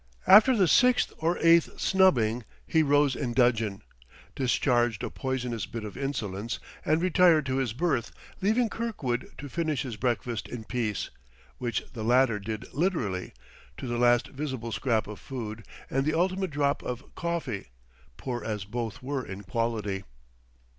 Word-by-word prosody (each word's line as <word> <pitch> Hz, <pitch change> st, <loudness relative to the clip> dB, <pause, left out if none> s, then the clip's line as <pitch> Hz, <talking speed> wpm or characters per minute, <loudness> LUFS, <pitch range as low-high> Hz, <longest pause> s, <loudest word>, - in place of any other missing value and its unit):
After 220 Hz, +7 st, +8 dB
the 190 Hz, -3 st, +4 dB
sixth 250 Hz, +7 st, +4 dB
or 165 Hz, +2 st, +1 dB
eighth 165 Hz, 0 st, +5 dB
snubbing 125 Hz, -, +3 dB, 0.2 s
he 160 Hz, -, +3 dB
rose 145 Hz, -2 st, +3 dB
in 125 Hz, -4 st, -2 dB
dudgeon, 115 Hz, -5 st, +2 dB, 0.5 s
discharged 120 Hz, -4 st, +1 dB
a -, -, -3 dB
poisonous 125 Hz, -6 st, -3 dB
bit 115 Hz, -2 st, -6 dB
of 105 Hz, -, -7 dB
insolence, 115 Hz, -6 st, -3 dB, 0.3 s
and 155 Hz, +1 st, +2 dB
retired 180 Hz, -4 st, +5 dB
to 130 Hz, 0 st, -1 dB
his 130 Hz, -4 st, 0 dB
berth, 130 Hz, -4 st, 0 dB, 0.3 s
leaving 220 Hz, +5 st, +3 dB
Kirkwood 205 Hz, -, -3 dB
to 145 Hz, -, -7 dB
finish 155 Hz, -2 st, -1 dB
his 120 Hz, -6 st, -6 dB
breakfast 120 Hz, -2 st, -1 dB
in 120 Hz, -2 st, -6 dB
peace; 110 Hz, -4 st, -2 dB, 0.5 s
which 120 Hz, -3 st, -2 dB
the 115 Hz, -3 st, -5 dB
latter 120 Hz, -1 st, +3 dB
did 110 Hz, +3 st, -5 dB
literally, 130 Hz, -, -1 dB, 0.5 s
to -, -, -6 dB
the 120 Hz, -1 st, -2 dB
last 120 Hz, 0 st, +4 dB
visible 130 Hz, -5 st, -4 dB
scrap 110 Hz, +1 st, 0 dB
of 105 Hz, 0 st, -8 dB
food 115 Hz, -4 st, -6 dB, 0.2 s
and 135 Hz, +1 st, 0 dB
the 155 Hz, +2 st, 0 dB
ultimate 185 Hz, +2 st, +1 dB
drop 145 Hz, -1 st, 0 dB
of 125 Hz, +1 st, -6 dB
coffee, 165 Hz, -, -3 dB, 0.5 s
poor 120 Hz, -2 st, -4 dB
as 105 Hz, -3 st, -3 dB
both 115 Hz, +1 st, -5 dB
were 135 Hz, 0 st, -2 dB
in 100 Hz, -1 st, -8 dB
quality. 105 Hz, -2 st, -2 dB
125 Hz, 155 wpm, -28 LUFS, 115-155 Hz, 0.5 s, After